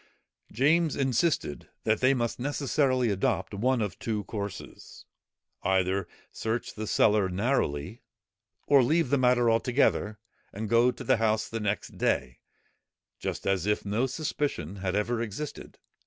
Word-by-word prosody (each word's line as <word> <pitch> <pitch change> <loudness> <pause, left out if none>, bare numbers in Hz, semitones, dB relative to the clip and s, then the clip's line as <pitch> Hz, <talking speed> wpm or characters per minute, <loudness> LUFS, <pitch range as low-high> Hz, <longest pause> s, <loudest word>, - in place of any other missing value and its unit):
James 155 +6 +2
insisted, 135 - 0
that 110 -1 +1
they 130 +2 +4
must 120 -1 -2
necessarily 135 -3 +1
adopt 100 +2 -1
one 120 +3 +1
of 100 -2 -5
two 110 -2 -2
courses; 100 -1 -7 0.6
either 95 0 +1 0.2
search 115 +1 -3
the 110 0 -5
cellar 105 -3 +3
narrowly, 95 - -1 0.6
or 140 -2 +6
leave 150 +2 +2
the 140 - +4
matter 125 -1 +3
altogether, 115 -2 +2 0.3
and 105 +1 -5
go 115 +2 +5
to 125 - -5
the - - +3
House 110 -1 +1
the 115 - -4
next 105 -1 -3
day, 60 -1 0 0.8
just - - -4
as 95 -1 0
if 105 0 0
no 110 +6 0
suspicion 130 - -3
had 95 0 -2
ever 115 +3 0
existed. 115 +7 -6
115 Hz, 140 wpm, -28 LUFS, 100-130 Hz, 0.8 s, or